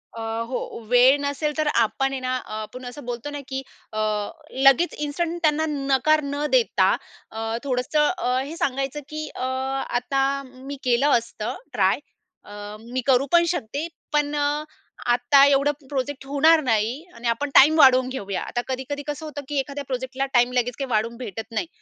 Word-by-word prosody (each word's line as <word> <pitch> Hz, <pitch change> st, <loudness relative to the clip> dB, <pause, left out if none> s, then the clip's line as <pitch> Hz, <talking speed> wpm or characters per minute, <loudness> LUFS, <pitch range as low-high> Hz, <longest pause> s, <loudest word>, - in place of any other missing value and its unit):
अ, 230 Hz, -, -6 dB, 0.3 s
हो, 255 Hz, -, -2 dB, 0.3 s
वेळ 250 Hz, +2 st, +6 dB
नसेल 285 Hz, +1 st, -1 dB
तर 310 Hz, -, +1 dB, 0.2 s
आपण 270 Hz, +5 st, -1 dB
आहे 270 Hz, -, -3 dB
ना, 255 Hz, 0 st, -1 dB
अ, -, -, -10 dB
आपण 250 Hz, +4 st, -8 dB
असं 245 Hz, +2 st, -8 dB
बोलतो 245 Hz, +3 st, -4 dB
ना, -, -, -4 dB
की 265 Hz, 0 st, -3 dB, 0.3 s
अ, 215 Hz, -, -2 dB, 0.7 s
लगेच 330 Hz, +6 st, +5 dB
इन्स्टंट 335 Hz, +4 st, -2 dB
त्यांना 310 Hz, 0 st, +2 dB
नकार 280 Hz, +2 st, +2 dB
न 285 Hz, +1 st, -2 dB
देता -, -, +3 dB, 0.4 s
अ, 225 Hz, +1 st, -3 dB
थोडंसं 280 Hz, +3 st, +1 dB
अ, 250 Hz, +1 st, 0 dB
हे 280 Hz, +5 st, -5 dB
सांगायचं, 270 Hz, +2 st, -1 dB
की 310 Hz, 0 st, -5 dB
"अ, -, -, -6 dB, 0.6 s
आता 270 Hz, +2 st, 0 dB, 0.2 s
मी 260 Hz, +2 st, -9 dB
केलं 250 Hz, +3 st, +3 dB
असतं 230 Hz, -2 st, -5 dB, 0.2 s
ट्राय 195 Hz, +4 st, +2 dB, 0.5 s
अ, -, -, -13 dB, 0.3 s
मी 240 Hz, +3 st, -4 dB
करू 265 Hz, 0 st, +4 dB
पण 345 Hz, 0 st, +6 dB
शकते. 305 Hz, -1 st, -2 dB, 0.3 s
पण 295 Hz, 0 st, +1 dB
अ, 290 Hz, +1 st, 0 dB, 0.5 s
आता 250 Hz, +3 st, +5 dB
एवढं 285 Hz, +1 st, +4 dB, 0.2 s
प्रोजेक्ट 275 Hz, 0 st, -3 dB
होणार 310 Hz, +3 st, +5 dB
नाही 225 Hz, -3 st, +2 dB, 0.2 s
आणि 235 Hz, +1 st, -5 dB
आपण 235 Hz, +5 st, 0 dB
टाईम 305 Hz, +4 st, +8 dB
वाढवून 260 Hz, -2 st, +6 dB
घेऊया." 200 Hz, -7 st, -4 dB
आता 240 Hz, -, -3 dB
कधी-कधी 265 Hz, +2 st, -4 dB
कसं 295 Hz, +2 st, -4 dB
होतं, 295 Hz, -1 st, -6 dB
की 290 Hz, -2 st, 0 dB
एखाद्या 280 Hz, +1 st, -4 dB
प्रोजेक्टला 260 Hz, +1 st, -2 dB
टाईम 245 Hz, 0 st, +4 dB
लगेच 245 Hz, -1 st, 0 dB
काही 270 Hz, -1 st, -3 dB
वाढून 230 Hz, +2 st, 0 dB
भेटत 225 Hz, -1 st, -7 dB
नाही. 230 Hz, +9 st, -2 dB
270 Hz, 175 wpm, -24 LUFS, 245-290 Hz, 0.7 s, टाईम